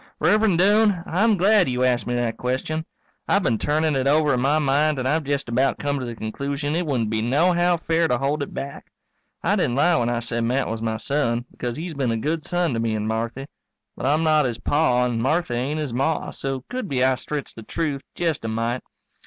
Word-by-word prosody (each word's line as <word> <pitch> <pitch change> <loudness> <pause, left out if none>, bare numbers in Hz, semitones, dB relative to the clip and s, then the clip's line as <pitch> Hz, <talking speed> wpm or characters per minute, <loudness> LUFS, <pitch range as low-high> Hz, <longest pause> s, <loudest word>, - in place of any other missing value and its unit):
_ - - -25 0.2
Rev'rend 200 +3 +3
Doane, 205 -1 +3
I'm 210 +5 +2
glad 195 -2 +4
you 125 0 0
asked 125 -2 +1
me 120 - -1
that 120 -2 -1
question. 145 +6 -2 0.4
I've 200 -1 +2
been 115 -8 +1
turnin' 155 0 +1
it 135 0 0
over 150 0 +3
in 125 - 0
my 140 +4 +3
mind 150 +1 +2
and 130 0 -1
I've 155 +2 +1
jest 140 -1 -1
about 130 +3 +1
come 145 -1 -1
to 130 - -4
the 120 - -5
conclusion 140 +7 -3
it 175 -1 -1
wouldn't 120 -7 0
be 110 0 0
nohow 175 +8 +2
fair 165 +1 +1
to 125 - +1
hold 140 +3 -1
it 140 - -4
back. 140 0 -7 0.6
I - - +2
didn't 120 - 0
lie 170 +5 +4
when 120 0 +1
I 120 -1 0
said 120 0 -2
Matt 125 +4 0
was 110 0 -4
my 110 -1 -1
son, 120 -2 -1
because 120 -1 -4
he's 165 +2 -5
been 135 -4 -1
a 115 - 0
good 155 +7 -2
son 175 -4 0
to 115 - -1
me 115 -1 0
and 105 0 -2
Marthy. 115 +4 -3 0.5
But - - -3
I'm 150 +3 +2
not 155 -2 +4
his 120 -3 -2
Pa 125 -5 +2
and 120 -2 -1
Marthy 155 +2 0
ain't 135 +6 -1
his 145 -6 -3
Ma, 135 +5 -1
so 135 -1 -4
could 250 -4 -4
be 130 -2 +1
I 130 0 +4
stretched 145 +3 -5
the 115 - -9
truth 140 +4 -3
jest 165 -7 -1
a - - -3
mite. 115 +3 -1
140 Hz, 235 wpm, -23 LUFS, 120-160 Hz, 0.6 s, glad